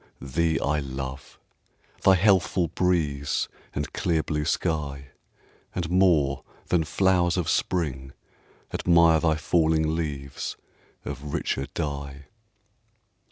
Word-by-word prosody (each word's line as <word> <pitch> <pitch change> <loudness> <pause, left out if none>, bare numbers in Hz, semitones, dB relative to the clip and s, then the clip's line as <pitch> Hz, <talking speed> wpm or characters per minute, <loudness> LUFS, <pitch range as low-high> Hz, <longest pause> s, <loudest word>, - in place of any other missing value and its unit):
thee 80 +5 0
I 75 +1 0
love, 65 0 -6 0.6
Thy 95 - +6
healthful 95 -2 +3
breeze 75 -6 0 0.3
and 75 0 -3
clear 80 -2 0
blue 75 -1 -2
sky; 70 -5 -2 0.7
And 85 -2 -2
more 85 -7 +3 0.3
than 85 -3 +2
flowers 90 +1 +2
of 85 -3 -1
Spring 70 -5 -1 0.6
admire 85 -2 +4
Thy 80 -1 +2
falling 80 0 +2
leaves 70 -4 -4 0.5
of 70 +1 -5
richer 70 0 -2
dye. 70 -2 -4
80 Hz, 105 wpm, -26 LUFS, 70-85 Hz, 0.7 s, Thy